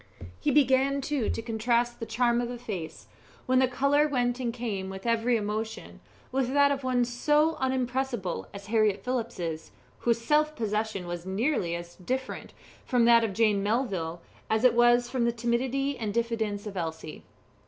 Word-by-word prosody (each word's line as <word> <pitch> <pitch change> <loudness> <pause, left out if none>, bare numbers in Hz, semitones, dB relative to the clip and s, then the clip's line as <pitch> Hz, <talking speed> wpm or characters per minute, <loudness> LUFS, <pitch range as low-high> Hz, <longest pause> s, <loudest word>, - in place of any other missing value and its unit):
He - - 0
began, 275 0 +3
too, 275 -4 -1
to - - -2
contrast 235 +1 0
the 230 - -5
charm 240 +1 +2
of 240 - -3
a 245 - -5
face, 200 -9 -6 0.4
when 255 0 +3
the 260 - +4
colour 280 +4 +2
went 245 -3 0
and 245 -2 -1
came 215 -6 -4
with 190 +2 -8
every 230 +1 +2
emotion, 215 +1 -4 0.3
with 260 -1 0
that 285 0 +5
of 275 -1 -2
one 250 -1 +2
so 295 +6 +2
unimpressible 260 -6 -1
as 200 0 -9
Harriett 215 -2 +1
Phillips's 200 -11 -3 0.3
whose 235 -1 +1
self 300 +5 +2
possession 215 -4 -2
was 175 +1 -6
nearly 190 - 0
as 170 0 -7
different 260 +8 -4 0.3
from 245 -2 +2
that 235 0 +6
of 215 -3 -1
Jane 215 -2 +2
Melville 195 -7 -1 0.3
as 220 +1 +1
it 255 - +6
was 240 0 +4
from 245 -1 0
the 235 - +2
timidity 250 +4 -1
and 215 -3 -2
diffidence 220 -2 -1
of 205 -2 -6
Elsie. 160 -3 -5
235 Hz, 170 wpm, -28 LUFS, 210-255 Hz, 0.4 s, that